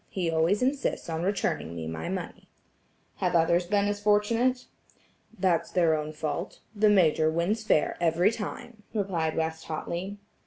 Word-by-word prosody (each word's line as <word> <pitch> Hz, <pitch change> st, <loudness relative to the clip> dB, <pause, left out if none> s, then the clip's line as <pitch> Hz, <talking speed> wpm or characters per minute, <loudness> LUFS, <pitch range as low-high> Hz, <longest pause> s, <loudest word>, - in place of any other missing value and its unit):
He 175 Hz, -4 st, -1 dB
always 165 Hz, +8 st, +2 dB
insists 265 Hz, -9 st, -1 dB
on 160 Hz, 0 st, -2 dB
returning 180 Hz, -, -1 dB
me 80 Hz, -1 st, -5 dB
my 80 Hz, 0 st, -4 dB
money." -, -, -6 dB, 0.7 s
"Have -, -, 0 dB
others 170 Hz, +1 st, +3 dB
been 200 Hz, +1 st, +2 dB
as 205 Hz, 0 st, -1 dB
fortunate?" 225 Hz, +5 st, +2 dB, 0.7 s
"That's 180 Hz, -3 st, +1 dB
their 170 Hz, -3 st, +3 dB
own 150 Hz, 0 st, -3 dB
fault; 155 Hz, +4 st, -4 dB
the 210 Hz, +1 st, +4 dB
Major 160 Hz, -5 st, +4 dB
wins 175 Hz, +7 st, 0 dB
fair 185 Hz, -8 st, +2 dB
every 170 Hz, +4 st, +3 dB
time," 230 Hz, +1 st, -7 dB
replied 175 Hz, -6 st, -1 dB
West 160 Hz, 0 st, -2 dB
hotly. 175 Hz, +5 st, -4 dB
175 Hz, 150 wpm, -28 LUFS, 160-205 Hz, 0.7 s, the